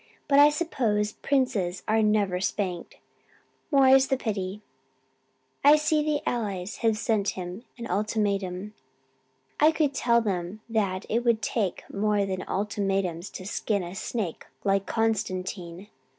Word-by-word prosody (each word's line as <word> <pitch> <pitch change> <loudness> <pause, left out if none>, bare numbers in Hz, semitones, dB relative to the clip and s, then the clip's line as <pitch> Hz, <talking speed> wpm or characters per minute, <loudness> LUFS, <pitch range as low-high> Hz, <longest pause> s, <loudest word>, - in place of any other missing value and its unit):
"But 280 -1 +5
I 290 +1 +9
suppose 235 -10 0
princes 225 -10 0
are 220 +1 +3
never 205 -4 +2
spanked, 185 -3 -3 0.7
more 275 -3 +5
is 265 0 +6
the 265 - +1
pity. 205 -3 -3 1.0
I 290 +2 +8
see 305 0 +2
the 300 -1 -1
Allies 205 -4 -2
have 225 -2 +1
sent 215 -2 +1
him 180 +3 -6 0.2
an 235 - -6
ultimatum. 200 -1 -1 0.9
I 305 +2 +6
could 305 -3 +1
tell 235 -3 +3
them 195 -2 -3
that 200 -5 -1
it 235 +2 0
will 235 -2 +3
take 210 -3 -2
more 205 0 +1
than 185 -1 -3
ultimatums 195 -3 -1
to 185 - -8
skin 205 0 -1
a 175 +1 -7
snake 195 -3 -4 0.2
like 195 -1 +1
Constantine. 185 -4 -2
210 Hz, 135 wpm, -27 LUFS, 190-235 Hz, 1.0 s, I